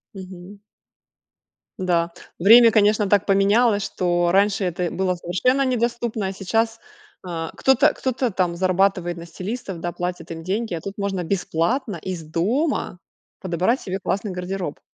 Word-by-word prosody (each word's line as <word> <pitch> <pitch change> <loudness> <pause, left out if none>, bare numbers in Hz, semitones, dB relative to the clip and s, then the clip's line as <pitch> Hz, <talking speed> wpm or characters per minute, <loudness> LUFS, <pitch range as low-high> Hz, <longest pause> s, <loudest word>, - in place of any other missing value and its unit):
Мгм. 190 +1 -10 1.2
Да. 170 -2 0 0.3
Время, 230 +6 +8
конечно, 210 -1 +3
так 200 -1 +3
поменялось, 205 +2 +3
что 175 -2 0
раньше 200 +2 +2
это 180 -1 -1
было 185 -1 0
совершенно 250 +11 +1
недоступно, 235 -4 -1
а - - -3
сейчас, 225 +4 -1 0.4
а, 165 -3 -5
кто-то 265 -2 +4
кто-то 255 -2 -1
там 180 -2 0
зарабатывает 185 -1 +1
на 170 - -8
стилистов, 190 +2 -6
да, 175 - -2
платит 180 0 -5
им 165 0 -7
деньги, 205 +3 -2
а 165 - -4
тут 195 +3 -7
можно 195 -3 -2
бесплатно 195 - -1
из 180 -2 -5
дома 195 - -1 0.4
подобрать 185 - 0
себе 190 0 -4
классный 200 +2 -2
гардероб. 180 -3 -4
190 Hz, 140 wpm, -22 LUFS, 175-220 Hz, 1.2 s, Время